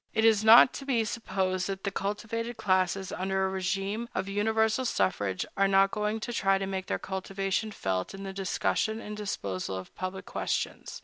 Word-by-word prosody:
It 220 Hz, 0 st, +3 dB
is 220 Hz, -2 st, +5 dB
not 225 Hz, +3 st, +9 dB
to -, -, -6 dB
be 235 Hz, -5 st, +2 dB
supposed 190 Hz, -4 st, -1 dB
that 195 Hz, -1 st, -4 dB
the 200 Hz, -, -1 dB
cultivated 225 Hz, +4 st, -3 dB
classes, 185 Hz, 0 st, +1 dB
under 190 Hz, +1 st, 0 dB
a 190 Hz, -, -3 dB
régime 195 Hz, +5 st, -2 dB
of 190 Hz, +1 st, -1 dB
universal 220 Hz, +4 st, +1 dB
suffrage, 95 Hz, -, 0 dB
are 195 Hz, 0 st, +3 dB
not 195 Hz, 0 st, +4 dB
going 210 Hz, +1 st, -1 dB
to 240 Hz, -, -4 dB
try 195 Hz, -4 st, +3 dB
to 195 Hz, -, -2 dB
make 190 Hz, -1 st, -4 dB
their -, -, 0 dB
cultivation 195 Hz, +2 st, -2 dB
felt 95 Hz, -, -2 dB
in 195 Hz, -, -8 dB
the 195 Hz, 0 st, -5 dB
discussion 200 Hz, +3 st, 0 dB
and 210 Hz, -2 st, -6 dB
disposal 100 Hz, -, -3 dB
of 95 Hz, -, -9 dB
public 185 Hz, +1 st, -5 dB
questions. -, -, -3 dB
195 Hz, 185 wpm, -29 LUFS, 190-220 Hz, -, not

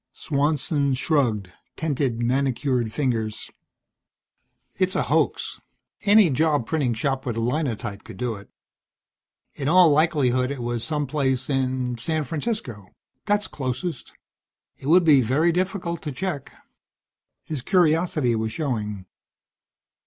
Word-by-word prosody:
Swanson 145 Hz, -1 st, 0 dB
shrugged; 120 Hz, -, 0 dB, 0.2 s
tented 135 Hz, -7 st, -1 dB
manicured 130 Hz, -2 st, 0 dB
fingers. 115 Hz, -6 st, -2 dB, 1.2 s
"It's 185 Hz, 0 st, 0 dB
a -, -, +2 dB
hoax. -, -, 0 dB, 0.4 s
Any 205 Hz, -4 st, +6 dB
job 145 Hz, -2 st, +2 dB
printing 135 Hz, -4 st, 0 dB
shop 135 Hz, +3 st, -1 dB
with 120 Hz, -3 st, -3 dB
a -, -, 0 dB
Linotype 120 Hz, -5 st, -2 dB
could -, -, -11 dB
do 125 Hz, -2 st, -2 dB
it. 100 Hz, -2 st, -11 dB, 1.0 s
In 140 Hz, -, -4 dB
all 175 Hz, 0 st, +6 dB
likelihood 140 Hz, -5 st, +2 dB
it 140 Hz, -3 st, -4 dB
was 120 Hz, -1 st, -2 dB
some 150 Hz, -2 st, -1 dB
place 135 Hz, -2 st, -1 dB
in 130 Hz, -2 st, -1 dB
San 155 Hz, +5 st, -1 dB
Francisco. 145 Hz, -, -4 dB, 0.4 s
That's 205 Hz, 0 st, +1 dB
closest. 130 Hz, +3 st, -4 dB, 0.7 s
It 135 Hz, -, -8 dB
would 175 Hz, +4 st, +6 dB
be 145 Hz, -4 st, +6 dB
very 140 Hz, +9 st, +2 dB
difficult 180 Hz, -1 st, -2 dB
to 150 Hz, -, -4 dB
check." 150 Hz, 0 st, -4 dB, 0.9 s
His 150 Hz, -5 st, -5 dB
curiosity 160 Hz, -5 st, +2 dB
was 110 Hz, 0 st, -2 dB
showing. 105 Hz, -, -3 dB
135 Hz, 125 wpm, -24 LUFS, 120-160 Hz, 1.2 s, Any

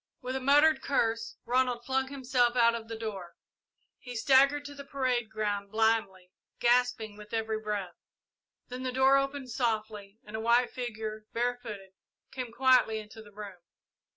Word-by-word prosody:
With 255 Hz, 0 st, -5 dB
a -, -, -1 dB
muttered 290 Hz, +4 st, +4 dB
curse, 230 Hz, -4 st, -1 dB
Ronald 245 Hz, -1 st, +1 dB
flung 265 Hz, +1 st, 0 dB
himself 255 Hz, -3 st, +1 dB
out 235 Hz, -1 st, +5 dB
of 230 Hz, -1 st, -5 dB
the 225 Hz, 0 st, -6 dB
room. 215 Hz, -4 st, -5 dB, 0.8 s
He 245 Hz, -1 st, -9 dB
staggered 275 Hz, +4 st, +4 dB
to 285 Hz, -, -7 dB
the 280 Hz, 0 st, -9 dB
parade 255 Hz, -5 st, -1 dB
ground 205 Hz, -2 st, -2 dB
blindly, 215 Hz, -4 st, 0 dB, 0.3 s
gasping 240 Hz, -3 st, +1 dB
with 210 Hz, +1 st, -13 dB
every 220 Hz, -1 st, -1 dB
breath. 205 Hz, -4 st, -4 dB, 0.7 s
Then 250 Hz, +1 st, -7 dB
the 255 Hz, 0 st, -2 dB
door 265 Hz, +2 st, +5 dB
opened 275 Hz, -1 st, -2 dB
softly 215 Hz, -4 st, -2 dB
and 210 Hz, +1 st, -9 dB
a -, -, -2 dB
white 235 Hz, +2 st, +3 dB
figure, 220 Hz, -3 st, -5 dB
barefooted, 230 Hz, -5 st, -3 dB, 0.4 s
came 250 Hz, -3 st, -5 dB
quietly 250 Hz, -2 st, +4 dB
into 215 Hz, +1 st, -9 dB
the 210 Hz, -1 st, -15 dB
room. 200 Hz, -3 st, -9 dB
235 Hz, 155 wpm, -29 LUFS, 215-255 Hz, 0.8 s, out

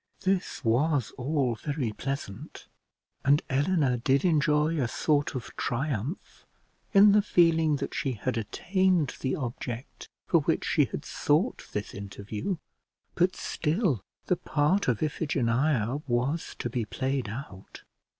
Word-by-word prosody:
This 190 Hz, -7 st, -1 dB
was 130 Hz, +3 st, +2 dB
all 135 Hz, -1 st, 0 dB
very 135 Hz, 0 st, -3 dB
pleasant, 130 Hz, -3 st, -6 dB, 0.6 s
and 145 Hz, +3 st, +4 dB
Eleanor 140 Hz, -2 st, +2 dB
did 135 Hz, +5 st, +2 dB
enjoy 150 Hz, -1 st, +3 dB
a 125 Hz, -, +1 dB
sort 145 Hz, +3 st, 0 dB
of 125 Hz, -, -6 dB
triumph 135 Hz, -, -3 dB, 0.5 s
in 200 Hz, +1 st, +8 dB
the 210 Hz, +1 st, +5 dB
feeling 165 Hz, -5 st, +3 dB
that 140 Hz, -, -4 dB
she 135 Hz, -5 st, -1 dB
had 120 Hz, +3 st, -2 dB
attained 175 Hz, -, +1 dB
the 130 Hz, -, -1 dB
object 120 Hz, -1 st, -6 dB, 0.2 s
for -, -, +4 dB
which -, -, 0 dB
she -, -, +3 dB
had -, -, -6 dB
sought 160 Hz, +11 st, 0 dB
this 105 Hz, 0 st, -3 dB
interview; 100 Hz, -, -4 dB, 0.6 s
but 180 Hz, +1 st, +2 dB
still 155 Hz, -, 0 dB, 0.2 s
the 180 Hz, -, +1 dB
part 155 Hz, +8 st, +1 dB
of 125 Hz, 0 st, +1 dB
Iphigenia 135 Hz, -3 st, 0 dB
was 130 Hz, +7 st, -1 dB
to -, -, -3 dB
be 120 Hz, 0 st, -2 dB
played 130 Hz, +1 st, -2 dB
out. 105 Hz, -5 st, -9 dB
140 Hz, 130 wpm, -28 LUFS, 120-160 Hz, 0.6 s, in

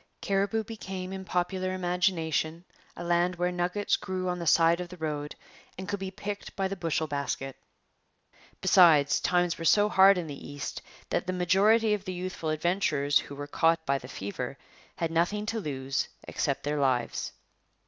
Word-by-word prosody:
Cariboo 200 Hz, +3 st, 0 dB
became 190 Hz, -4 st, -6 dB
in 190 Hz, 0 st, -5 dB
popular 185 Hz, +1 st, -1 dB
imagination 175 Hz, -2 st, 0 dB, 0.3 s
a -, -, -5 dB
land 175 Hz, +1 st, +2 dB
where 180 Hz, +1 st, 0 dB
nuggets 180 Hz, +3 st, 0 dB
grew 185 Hz, -2 st, -3 dB
on 180 Hz, 0 st, -2 dB
the 170 Hz, -, -4 dB
side 165 Hz, +2 st, +5 dB
of 175 Hz, -, -6 dB
the 180 Hz, -, -10 dB
road 150 Hz, -2 st, -4 dB, 0.4 s
and 185 Hz, 0 st, -6 dB
could 200 Hz, -1 st, -2 dB
be 190 Hz, 0 st, -4 dB
picked 200 Hz, +1 st, -6 dB
by 195 Hz, -1 st, 0 dB
the 195 Hz, -, -4 dB
bushel 165 Hz, -3 st, -1 dB
basket. 140 Hz, -2 st, -3 dB, 1.1 s
Besides, 155 Hz, -6 st, +6 dB
times 175 Hz, -1 st, +1 dB
were -, -, -4 dB
so 205 Hz, +5 st, +4 dB
hard 195 Hz, -1 st, +6 dB
in 175 Hz, -, -2 dB
the 145 Hz, -3 st, -8 dB
East 145 Hz, -1 st, -5 dB, 0.3 s
that -, -, 0 dB
the 185 Hz, -, -1 dB
majority 205 Hz, +5 st, +3 dB
of 205 Hz, -1 st, -3 dB
the 185 Hz, -, -3 dB
youthful 180 Hz, -3 st, -4 dB
adventurers 155 Hz, -3 st, +2 dB
who 140 Hz, -, -8 dB
were 145 Hz, +1 st, -5 dB
caught 165 Hz, +2 st, +2 dB
by 140 Hz, 0 st, +1 dB
the 125 Hz, -, -10 dB
fever 100 Hz, -6 st, -5 dB, 0.4 s
had 165 Hz, -1 st, -2 dB
nothing 180 Hz, +6 st, +1 dB
to 225 Hz, +1 st, -2 dB
lose 135 Hz, -6 st, -2 dB, 0.2 s
except -, -, -1 dB
their 145 Hz, +1 st, -1 dB
lives. 130 Hz, -3 st, 0 dB
175 Hz, 175 wpm, -28 LUFS, 155-190 Hz, 1.1 s, Besides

